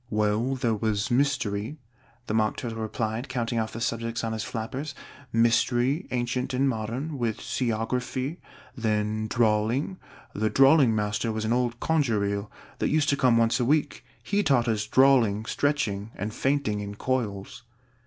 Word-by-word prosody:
"Well, 105 +4 +1
there 120 -3 0
was 110 0 -1
Mystery," 130 -2 0 0.5
the 110 - -3
Mock 110 -1 +1
Turtle 115 -2 -5
replied, 110 +3 -3
counting 120 -2 -1
off 110 0 -2
the 115 - -5
subjects 115 0 -2
on 115 0 -2
his 110 -1 -3
flappers, 130 +6 -5 0.4
"Mystery, 120 +6 +2
ancient 125 +1 -1
and 135 +2 +2
modern, 130 +5 -3
with 115 -3 -1
Seaography; 125 +5 -2 0.4
then 110 -2 -1
Drawling 115 - +1 0.3
the 110 +1 0
Drawling 135 -3 +5
master 105 +1 -1
was 110 0 -3
an 110 - +1
old 120 -1 0
conger 130 -11 +1
eel, 100 +1 -2 0.3
that - - +1
used 150 -1 +2
to 140 - +3
come 125 -4 +3
once 115 +2 +3
a - - +2
week: 150 +3 +1 0.2
he 205 0 +1
taught 135 -9 +2
us 110 -2 0
Drawling, 120 -6 +4
Stretching, 115 -8 -1
and 105 +1 -4
Fainting 135 -7 0
in 100 0 -5
Coils." 110 -4 -3
115 Hz, 155 wpm, -26 LUFS, 110-130 Hz, 0.5 s, Drawling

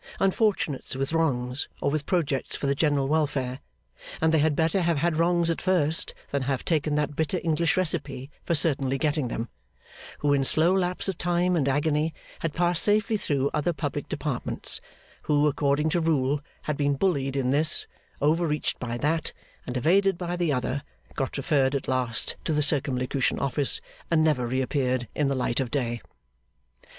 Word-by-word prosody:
Unfortunates 195 - +1
with 135 +3 -2
wrongs, 130 -5 0
or 140 - 0
with 150 -1 -2
projects 150 -7 0
for - - -4
the 140 - +2
general 145 -2 +1
welfare 140 -4 0 0.6
(and 160 0 +2
they 160 - +4
had 150 0 +2
better 165 +4 +2
have 170 -2 +1
had 165 +2 +1
wrongs 170 0 +2
at 165 - -3
first, 165 -4 +1 0.2
than 140 - 0
have 135 0 -2
taken 155 -2 +1
that 150 -1 -1
bitter 160 +4 0
English 165 0 +1
recipe 140 -6 -1
for 170 - 0
certainly 135 -4 +2
getting 150 -2 0
them), 115 0 -3 0.7
who 145 -1 +1
in 140 -1 +2
slow 160 +6 +3
lapse 185 -1 +1
of 190 -4 -3
time 175 +1 +1
and 145 -5 +1
agony 150 +3 +1 0.2
had 165 - -2
passed 175 0 +2
safely 215 +1 +3
through 140 -8 0
other 155 +3 0
public 150 - -4
departments; - - -1 0.4
who, 145 0 +3
according 145 +2 +1
to 175 - +1
rule, 145 -3 +1 0.2
had 150 -2 -2
been 145 -1 +1
bullied 135 -5 0
in 130 -2 +1
this, 155 +3 +3 0.4
over 165 +3 +3
reached 150 -1 -2
by 120 -1 -3
that, 155 +5 0 0.4
and 125 - -2
evaded 190 +7 +3
by 175 0 -3
the 175 -3 0
other; 130 +1 -1 0.3
got 135 -1 -3
referred 140 -1 +1
at 140 - -3
last 125 -3 -1
to 160 - -1
the 150 0 +2
Circumlocution 135 -2 0
Office, 140 +1 0 0.3
and 160 -2 +3
never 140 -6 +2
reappeared 130 -1 0
in 150 - +1
the 135 - 0
light 125 -1 0
of 130 -3 -1
day. 120 -4 -2
150 Hz, 175 wpm, -26 LUFS, 135-165 Hz, 0.7 s, they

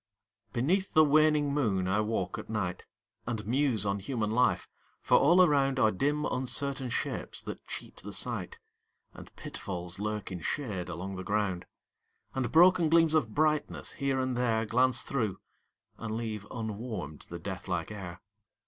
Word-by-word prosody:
Beneath 175 +11 0
the 155 - +8
waning 150 -1 +4
moon 100 -10 +1
I 100 +3 +2
walk 105 -4 -2
at - - -9
night, 100 -5 -2 0.4
And 110 -3 -3
muse 125 -3 +1
on 100 0 0
human 110 0 -2
life 125 +2 +2 0.3
for - - +4
all 175 +6 +6
around 135 -5 +3
Are 110 -3 +5
dim 145 +9 0
uncertain 130 +1 -1
shapes - - -3
that - - -8
cheat - - -7
the 105 - -8
sight, 100 -1 -4 0.6
And - - -12
pitfalls 90 -1 -6
lurk 105 -1 -3
in 90 - -4
shade 105 - -3
along 95 +3 -5
the 95 - -5
ground, 100 -3 -1 0.7
And 130 -3 -1
broken 175 0 +6
gleams 165 -1 +5
of 135 -9 +1
brightness, 155 0 +1
here 135 -2 -1
and 130 -1 0
there, 115 -2 +1
Glance 125 +3 +2
through, 110 -8 -1 0.6
and 110 -1 -3
leave 110 -3 -4
unwarmed 110 - -5
the 85 - -5
death 95 +3 -6
like 90 0 -2
air. 90 -4 -7
115 Hz, 155 wpm, -30 LUFS, 100-140 Hz, 0.7 s, the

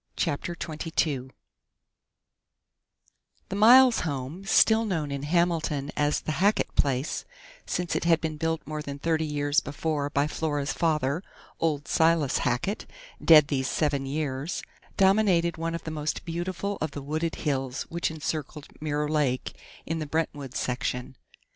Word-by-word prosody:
CHAPTER 170 +4 -2
TWENTY 160 0 -5
TWO 140 -5 0 2.2
The 195 - -3
Miles 245 +4 +7
home, 145 +4 -4
still 220 +2 +5
known 165 -9 -2
in 140 -1 -3
Hamilton 160 -2 0
as 150 0 +1
the - - -3
Hackett 205 +2 +2
place, 135 +1 0 0.4
since 175 -1 -1
it - - -1
had 170 -1 +4
been 160 -2 -3
built 160 +1 -1
more 155 0 -4
than 140 -1 -6
thirty 160 +2 0
years 145 0 +1
before 145 0 -2
by 145 -1 +1
Flora's 145 -1 -2
father, 155 -2 0 0.4
old 150 -3 0
Silas 160 -4 +3
Hackett, 125 - -1 0.4
dead 155 -3 +7
these 130 -2 0
seven 140 -3 0
years, 145 +1 -3 0.3
dominated 190 -4 +3
one 165 +1 -2
of 170 - -6
the 160 - -5
most 150 -1 -3
beautiful 180 +4 -3
of 155 - 0
the 140 - -5
wooded 155 +3 -2
hills 135 -3 -2
which 170 0 -2
encircled 155 -1 -5
Mirror 150 -1 -1
Lake 140 -5 0 0.3
in 165 0 -2
the 155 - -4
Brentwood 145 -4 -3
section. 125 +1 -2
155 Hz, 145 wpm, -27 LUFS, 145-170 Hz, 2.2 s, Miles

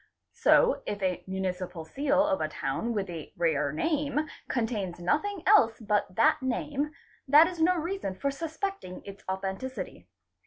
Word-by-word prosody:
So - - +4
if 205 - -2
a 185 -1 0
municipal 185 -3 -3
seal 285 - +2
of 290 -2 0
a - - +1
town 235 - -2
with 200 -2 -1
a 165 -4 -7
rare 150 -4 +1
name 295 - 0 0.2
contains 215 -8 -2
nothing 335 - 0
else 245 - +5
but 210 -4 0
that 230 - +4
name, 285 +3 -1 0.4
that 295 +4 +8
is 340 -1 -4
no 360 +3 +4
reason 340 - -3
for 280 +7 -1
suspecting 325 - -5
its 200 0 -10
authenticity. 190 - -4
240 Hz, 150 wpm, -29 LUFS, 190-305 Hz, 0.4 s, that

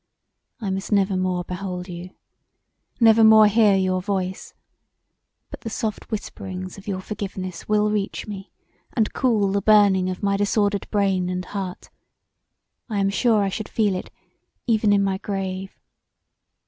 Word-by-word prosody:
I 205 -5 -3
must 190 +2 -4
never 200 -1 +2
more 185 -1 -1
behold 180 0 -5
you; 175 0 -7 0.9
never 225 -1 +6
more 220 0 +8
hear 210 -1 +4
your 185 -1 +1
voice; 190 -1 -3 1.0
but - - -9
the 225 - -5
soft 220 -1 -4
whisperings 185 -4 -6
of 195 - -14
your 190 -2 -2
forgiveness 185 -3 -6
will 210 0 +2
reach 205 -2 -2
me 200 -2 -8 0.4
and 220 -4 0
cool 215 -7 +2
the 200 0 0
burning 200 -4 +4
of 185 +1 -5
my 200 0 +2
disordered 205 0 0
brain 195 -3 +1
and 180 0 -3
heart; 190 -3 -6 1.0
I 215 - -2
am 195 0 +1
sure 220 -1 +2
I 195 - 0
should 210 +2 -5
feel 210 -3 +1
it 185 - -5 0.6
even 220 -3 +2
in 200 -1 +4
my 190 -1 -1
grave. 190 -1 -5
200 Hz, 150 wpm, -23 LUFS, 185-210 Hz, 1.0 s, more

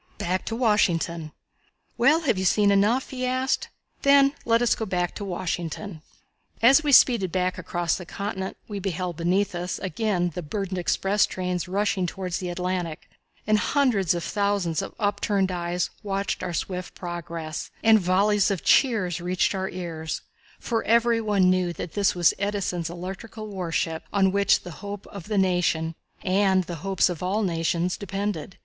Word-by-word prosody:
Back 185 +2 -2
to 225 - -2
Washington. 170 -8 +1 0.6
"Well, 300 +7 +4
have 285 -8 +1
you - - -1
seen 200 +2 +4
enough?" 210 +6 +2
he 255 -1 -4
asked. 255 +1 0 0.3
"Then 280 0 +5
let 230 +1 +3
us 240 - +4
go 220 - -4
back 180 -2 -1
to - - -6
Washington." 175 -1 -4 0.6
As 270 +6 +6
we 295 - +1
speeded 235 -9 +5
back 185 0 -1
across 175 -1 -1
the 180 - -8
continent 195 -1 -4
we 205 -2 -5
beheld 180 -2 -3
beneath 185 +4 +1
us 175 +1 -3
again 190 -3 -1
the 180 - -4
burdened 185 +3 -3
express 195 +5 +2
trains 180 -1 -3
rushing 195 -1 0
toward 180 0 -5
the 180 0 -2
Atlantic, 175 -2 -3 0.3
and 215 0 +3
hundreds 215 - +2
of 170 - -3
thousands 200 -6 0
of - - -7
upturned 205 -2 0
eyes 175 0 -2
watched 200 -2 -2
our - - -3
swift 180 +1 -4
progress, 170 -2 -5
and 220 -1 +6
volleys 200 +3 +3
of 195 -4 -2
cheers 185 - +3
reached 180 +3 +1
our 190 0 -2
ears, 165 -3 -5 0.4
for 225 -1 -1
every 235 0 +3
one 205 -4 +2
knew 185 -1 +1
that 170 - -7
this 200 -2 +2
was 175 -2 +4
Edison's 195 -5 -2
electrical 190 +5 -7
warship, 165 -4 -2
on 195 -2 +3
which 200 +1 +3
the 175 - -9
hope 205 -1 -6
of 200 -4 -8
the 210 -1 -2
nation, 175 -4 +1 0.3
and 190 0 +3
the 175 -1 -6
hopes 195 0 +2
of 175 -4 -4
all 190 +4 0
the - - +1
nations, 170 +2 0
depended. 195 -3 -4
190 Hz, 170 wpm, -25 LUFS, 175-205 Hz, 0.6 s, As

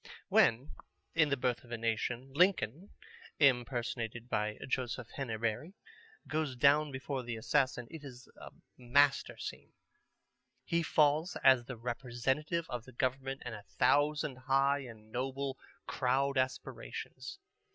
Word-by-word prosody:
When, 120 +6 +4 0.4
in 155 -3 +4
The 140 - +1
Birth 125 0 -1
of 120 - -17
a 120 - -2
Nation, 115 +3 -2
Lincoln 180 - +2 0.5
(impersonated 120 -3 +1
by 105 -1 -1
Joseph 125 -3 -2
Henabery) 115 - -2 0.5
goes 155 -4 -1
down 145 +3 +4
before 130 0 -3
the 120 -1 -4
assassin, 130 0 +1
it 160 -2 -9
is 125 -3 -10
a - - -10 0.3
master 140 +3 +3
scene. - - -7 0.9
He 170 0 +1
falls 155 +1 +2
as 130 -3 +6
the 125 -1 -7
representative 130 +7 -1
of 120 -1 -5
the 130 - -13
government 135 +2 -2
and 125 - -4
a 105 - -7 0.2
thousand 145 -2 +3
high 135 +2 +2
and 110 -5 -11
noble 135 +2 -3 0.3
crowd 135 +2 +1
aspirations. 130 - -3
130 Hz, 130 wpm, -33 LUFS, 120-145 Hz, 0.9 s, as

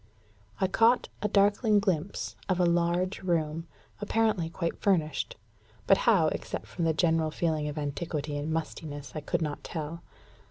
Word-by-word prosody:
I - - +3
caught 230 +6 +3
a 210 - +1
darkling 205 +2 +3
glimpse 190 -2 -2
of 185 -1 +1
a 180 - +4
large 175 +2 +1
room, 165 -2 -1 0.3
apparently 210 -5 +1
quite 170 0 -3
furnished; 160 -7 +1 0.5
but - - +5
how, - - +5
except - - -4
from 170 - -3
the 160 - +3
general 160 -2 +2
feeling 155 -1 -1
of 150 +1 -5
antiquity 150 0 -3
and 145 +2 -2
mustiness, 155 -3 -4
I 155 - -4
could 150 - -1
not 150 -2 -4
tell. 160 0 -5
165 Hz, 155 wpm, -29 LUFS, 155-190 Hz, 0.5 s, but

